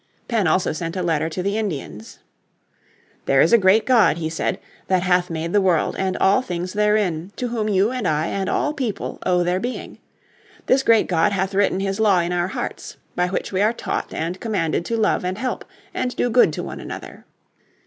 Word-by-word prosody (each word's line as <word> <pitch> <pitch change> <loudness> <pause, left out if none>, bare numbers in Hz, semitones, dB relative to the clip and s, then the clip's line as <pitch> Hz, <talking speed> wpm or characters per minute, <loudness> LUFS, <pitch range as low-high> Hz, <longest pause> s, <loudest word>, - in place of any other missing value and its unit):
Penn 220 -7 +1
also 180 +4 +1
sent 165 +1 -4
a 185 - -2
letter 160 -2 0
to 180 +3 -4
the 200 +3 0
Indians. 145 - -5 1.1
"There 135 - +4
is 165 - +4
a - - +9
great 195 +3 +4
God," 220 -11 +4
he 160 -1 -3
said, 165 - -2 0.3
"that 185 -2 +2
hath 180 -1 +2
made 165 +1 -4
the 205 - +4
world 180 -4 +1
and 190 -1 -1
all 195 +6 +3
things 180 -5 -4
therein, 205 -5 +1
to 250 - -3
Whom 220 -2 -1
you, 200 +3 +2
and 250 -7 -2
I, 155 +1 +1
and 195 +2 -2
all 300 - 0
people, 255 -8 -4
owe 180 -1 +3
their 180 +1 0
being. 245 +5 -6 0.7
This 265 - +3
great 230 -4 +4
God 180 +3 +1
hath 190 0 -1
written 195 -1 +1
His 195 +1 -2
law 210 -4 +4
in 175 +1 -1
our 175 0 0
hearts, 190 - -6 0.2
by 180 0 +1
which 180 - -3
we 190 0 0
are 215 +3 +3
taught - - -4
and 170 +3 -3
commanded 175 -7 -1
to 230 - -1
love 215 -4 +1
and 185 +1 -2
help, 255 +2 -3 0.3
and 250 -1 -2
do 245 - 0
good 245 +2 +5
to - - -4
one - - -7
another. - - -9
190 Hz, 210 wpm, -21 LUFS, 175-215 Hz, 1.1 s, a